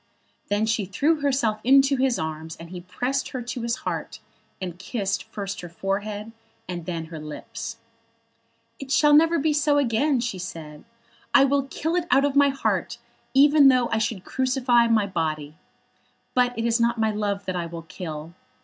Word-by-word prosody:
Then 205 +2 +1
she 220 -2 0
threw 295 - +1
herself 260 -6 +1
into 275 +2 +5
his 260 -2 +1
arms, 160 0 -5
and 165 +1 -11
he 180 -1 -7
pressed 250 +9 -2
her 255 - -5
to 245 +1 -5
his 235 +1 -1
heart, - - -4 0.4
and 180 -2 -6
kissed 195 -1 -2
first 200 -2 -6
her 175 - -8
forehead 205 +5 -3 0.4
and 175 -2 -6
then 165 -2 -3
her 160 - -5
lips. 225 +9 -7 1.0
"It 275 - -8
shall 295 +1 +5
never 330 +3 +5
be 305 +1 +1
so 295 0 +2
again," 270 +1 +2
she 230 -6 -3
said. 155 -4 -8 0.5
"I 270 - +8
will 275 0 +1
kill 320 +4 -2
it 350 -1 0
out 275 +1 +4
of 285 -1 -1
my 285 0 +6
heart 275 0 -1 0.4
even 290 +1 +7
though 255 -2 +4
I 225 - 0
should 215 -4 -2
crucify 255 -2 +2
my 220 -3 +3
body. 155 -5 -3 0.8
But 245 -1 +2
it 230 - -1
is 235 0 +2
not 235 0 +2
my 220 -1 +2
love 205 -1 -2
that 185 0 -3
I 170 -1 -2
will 165 0 -8
kill. 160 -2 -7
225 Hz, 180 wpm, -24 LUFS, 180-270 Hz, 1.0 s, I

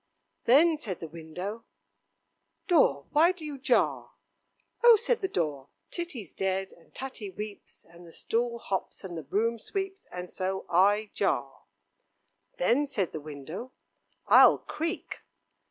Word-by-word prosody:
"Then," 310 +6 +6
said 205 - -5
the 165 - -6
window, 175 +8 -7 1.0
"Door, 210 - +3
why 325 +4 +5
do 355 -4 -8
you 290 -2 -6
jar?" 260 - +1 0.7
"Oh!" 475 -1 +10
said 470 +2 +1
the 385 - -1
door, 150 - -2 0.2
"Titty's 280 - -5
dead, 190 0 -2
and 170 - -22
Tatty 260 -6 -6
weeps, 205 +2 -9
and 170 +1 -15
the - - -13
stool 235 +6 -1
hops, 195 -4 -4
and 180 -3 -6
the 165 - -4
broom 225 +9 0
sweeps, 390 - -4
and 180 0 -6
so 190 +1 -3
I 205 +4 +3
jar." 140 -8 -1 0.9
"Then," 250 +11 +2
said 200 -10 -1
the 155 - -6
window, 155 - -8 0.5
"I'll - - +8
creak." 330 +3 -4
205 Hz, 140 wpm, -29 LUFS, 175-290 Hz, 1.0 s, Oh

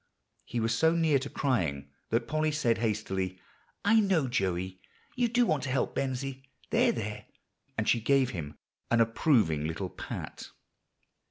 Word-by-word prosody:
He 120 - -3
was 115 0 +1
so 160 +6 +3
near 160 -4 +3
to 135 +2 -5
crying 80 - -1 0.2
that 115 +1 0
Polly 155 0 +1
said 120 -7 +1
hastily, 95 -4 -1 0.5
"I 220 +2 +6
know, 190 -9 +2
Joey, 95 -5 -1 0.3
you 245 -2 +2
do 245 +1 +3
want 155 -8 +1
to - - -3
help 130 +1 0
Bensie; 135 0 -2 0.3
there, 240 +1 +4
there," 105 - -5 0.5
and - - 0
she 115 - +3
gave 135 +1 +3
him 75 -5 -6 0.3
an 115 - +3
approving 115 - +3
little 90 +3 -4
pat. - - -7
120 Hz, 155 wpm, -30 LUFS, 95-155 Hz, 0.5 s, I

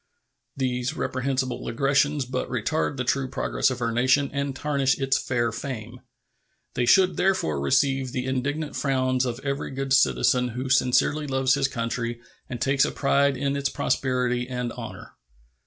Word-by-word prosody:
These 125 -2 -1
reprehensible 130 0 -2
aggressions 140 +2 +1
but 125 - -3
retard 130 +4 -1
the 130 - -1
true 135 +1 0
progress 130 - 0
of 125 -1 -4
our 115 - 0
nation 130 +4 +2
and 140 -1 -2
tarnish 140 -2 +1
its 135 -1 +1
fair 120 -2 -1
fame. 120 -1 -6 0.7
They 120 - 0
should 185 +7 +5
therefore 80 - +1
receive 135 - +1
the 125 -1 -3
indignant 145 +4 -2
frowns 130 -2 +1
of 120 0 -4
every 140 -1 -2
good 135 0 -2
citizen 125 -1 +3
who 125 +2 -4
sincerely 135 +3 +2
loves 135 -1 +2
his 140 -2 +2
country 115 -2 -3 0.3
and 120 - -5
takes 135 +2 +2
a - - +1
pride 140 -1 +2
in 140 +1 -1
its 140 0 0
prosperity 125 -2 0
and 125 -1 -3
honor. - - -9
130 Hz, 155 wpm, -25 LUFS, 125-140 Hz, 0.7 s, should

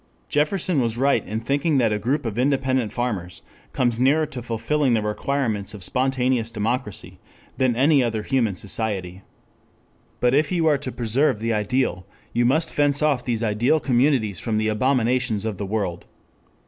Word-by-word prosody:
Jefferson 155 +1 +1
was 115 -1 -1
right 140 +2 +2
in 110 +1 -3
thinking 140 +5 0
that 115 -4 +2
a 105 - -1
group 130 +6 -1
of 115 0 -3
independent 130 -3 +1
farmers 105 -8 -4 0.3
comes 120 -2 0
nearer 145 +5 +3
to 130 -4 -7
fulfilling 120 +3 0
the 110 - +1
requirements 110 -2 -2
of 100 - -7
spontaneous 130 0 +1
democracy 115 0 -4 0.4
than 130 -3 +2
any 140 +3 +4
other 110 -3 -2
human 120 -7 0
society. 95 -3 -3 1.0
But 125 0 +2
if 145 +3 +2
you 170 -3 +1
are 150 -3 +3
to 135 -2 -5
preserve 125 +3 +1
the 115 +2 -1
ideal, 105 -4 -1 0.3
you 120 0 +2
must 160 +5 +1
fence 145 0 +1
off 140 -5 +2
these 115 -2 -2
ideal 115 +8 +2
communities 125 - +1
from 110 -2 -2
the 110 0 +1
abominations 125 -1 +1
of 110 -4 -3
the 100 - -4
world. 95 -5 -3
120 Hz, 165 wpm, -23 LUFS, 110-135 Hz, 1.0 s, any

